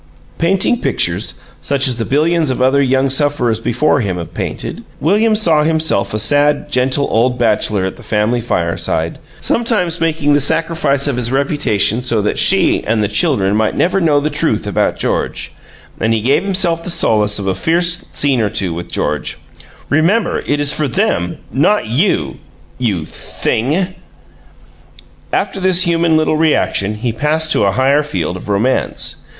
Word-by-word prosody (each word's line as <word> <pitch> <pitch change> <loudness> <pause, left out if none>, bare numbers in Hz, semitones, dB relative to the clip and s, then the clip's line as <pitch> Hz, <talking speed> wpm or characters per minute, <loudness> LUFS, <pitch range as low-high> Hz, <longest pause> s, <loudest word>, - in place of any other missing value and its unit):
Painting 195 +7 +1
pictures, - - -1 0.3
such 140 -1 0
as 125 -2 -1
the 115 - -2
billions 155 +2 +1
of 130 - -2
other 130 +2 +3
young 135 0 +2
sufferers 135 -5 0
before 130 +6 +1
him 95 -7 -2
have 85 -1 -7
painted, - - -5 0.2
William 215 +8 +2
saw 165 -8 +3
himself 160 -9 0
a 105 - -2
sad, 145 +7 +2
gentle 130 +2 +1
old 125 +3 +1
bachelor 105 -4 +1
at 95 - -5
the - - -13
family 110 +2 0
fireside, 85 -5 -2 0.2
sometimes 195 -8 0
making 160 -3 +1
the 145 - +4
sacrifice 145 -2 +1
of 140 -4 -1
his 120 -1 -1
reputation 135 -5 0
so 120 -3 0
that 105 0 -1
SHE - - +3
and 110 -1 +1
the - - +1
children 105 - +1
might 110 0 0
never 190 +3 +1
know 150 -4 +3
the 150 +2 -2
truth 145 -9 0
about 100 - 0
George; - - -2 0.5
and 115 0 +1
he 110 - -1
gave 135 - +2
himself 180 -4 0
the 180 - -5
solace 105 -11 +1
of 100 - -4
a 95 - 0
fierce 170 - +1 0.2
scene 135 -4 +1
or 105 - 0
two 95 -4 -2
with 85 +1 -7
George: - - -2 0.5
"Remember, 170 +10 +1
it 145 +1 0
is 145 0 +2
for 150 -1 -1
them, 90 -7 -1
not 150 - +2
you 115 - 0 0.4
you 100 -10 -1
THING!" 160 - -2 1.4
After - - -1
this 185 -1 +3
human 165 -1 +2
little 155 0 +1
reaction 130 -10 +1
he 115 +2 -3
passed 155 +6 0
to 105 - +2
a 100 - +1
higher 135 +4 +2
field 90 - -3
of 95 - -9
romance. 110 +6 0
135 Hz, 165 wpm, -15 LUFS, 110-160 Hz, 1.4 s, the